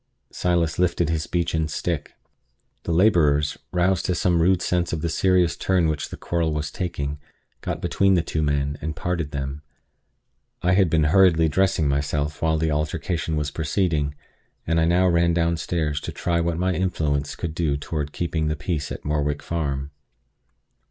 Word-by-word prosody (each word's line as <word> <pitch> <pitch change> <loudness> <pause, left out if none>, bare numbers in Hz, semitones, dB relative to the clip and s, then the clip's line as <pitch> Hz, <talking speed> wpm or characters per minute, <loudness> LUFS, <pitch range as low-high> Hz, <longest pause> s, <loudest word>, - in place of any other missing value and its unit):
Silas 85 -2 0
lifted 85 -2 +1
his 80 -1 -2
beechen 80 -2 0
stick. 75 -1 -3 0.7
The - - -1
laborers, 80 -6 +3
roused 90 +1 +1
to 90 - +1
some 85 -1 +2
rude 90 0 +3
sense 90 -1 0
of 80 - -2
the 85 - -1
serious 90 0 +2
turn 90 -3 +1
which 75 -2 -2
the - - -8
quarrel 85 -2 -1
was 75 0 -3
taking, 75 -5 -3 0.4
got - - -4
between 95 -1 +3
the 85 - +2
two 80 - -2
men, 70 -1 0
and 80 +1 -3
parted 85 -4 -2
them. 70 0 -4 1.0
I 90 - +3
had 95 -2 +4
been 80 -1 +3
hurriedly 80 0 +5
dressing 95 -1 +2
myself 70 +1 -1
while 80 -1 +2
the 80 0 0
altercation 80 +2 -1
was 75 -1 -1
proceeding; 80 -3 0 0.5
and 80 0 +1
I 80 - +3
now 90 +2 +3
ran 85 -1 +3
downstairs 85 -3 0
to - - -5
try 85 -1 -1
what 85 -1 -1
my 90 +1 +1
influence 80 -5 -1
could 85 -2 -4
do 80 -4 0
toward 75 0 -4
keeping 80 -2 -2
the 75 - 0
peace 75 0 -3
at - - -7
Morwick 75 -1 -1
Farm. 70 -4 -3
80 Hz, 170 wpm, -23 LUFS, 75-85 Hz, 1.0 s, hurriedly